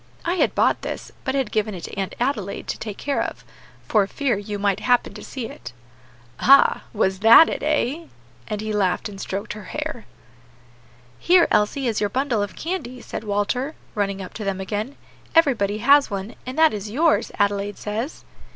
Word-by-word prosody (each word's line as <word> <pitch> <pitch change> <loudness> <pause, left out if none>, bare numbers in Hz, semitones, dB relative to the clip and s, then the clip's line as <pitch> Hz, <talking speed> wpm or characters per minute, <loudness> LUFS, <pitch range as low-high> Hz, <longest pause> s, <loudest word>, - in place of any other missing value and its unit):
I 345 - +1
had 365 - +1
bought - - +2
this, - - -6
but 265 -1 -1
had 265 -6 0
given 215 -2 -1
it 175 - -8
to - - -7
Aunt 195 -1 -3
Adelaide 230 -6 -2
to - - -3
take 210 -2 -6
care 280 -1 -1
of, - - -5 0.4
for 205 -3 +3
fear 275 +1 0
you 205 +1 -5
might 200 -1 +1
happen 245 -1 +2
to - - -10
see 260 -4 -6
it." 120 - -9 0.7
"Ah! 275 +2 +6
that - - -14
was 190 -3 +1
it, 230 +9 +7
eh?" 305 +1 0 0.4
and 210 -1 -3
he 215 0 -3
laughed 190 -2 +1
and 195 -1 -9
stroked 195 +2 -4
her 210 -2 -10
hair. 300 -1 -5 1.1
"Here, 350 0 +5
Elsie, 210 +7 +2
here 250 -3 +1
is 220 - -2
your 205 - +1
bundle 255 -1 0
of 205 -1 -4
candy," 305 -8 -4
said 225 - -6
Walter, 215 +8 -1 0.2
running 200 -2 -2
up 185 - -10
to 220 - -6
them 195 -1 -2
again. 210 +7 -4 0.4
"Everybody 225 -11 +3
has 280 +5 +5
one, 200 +2 -5
and 255 - -5
that 320 -4 +5
is 210 0 -5
yours, 305 +8 +2
Adelaide 205 0 0
says." 220 +8 -4
215 Hz, 190 wpm, -23 LUFS, 200-275 Hz, 1.1 s, it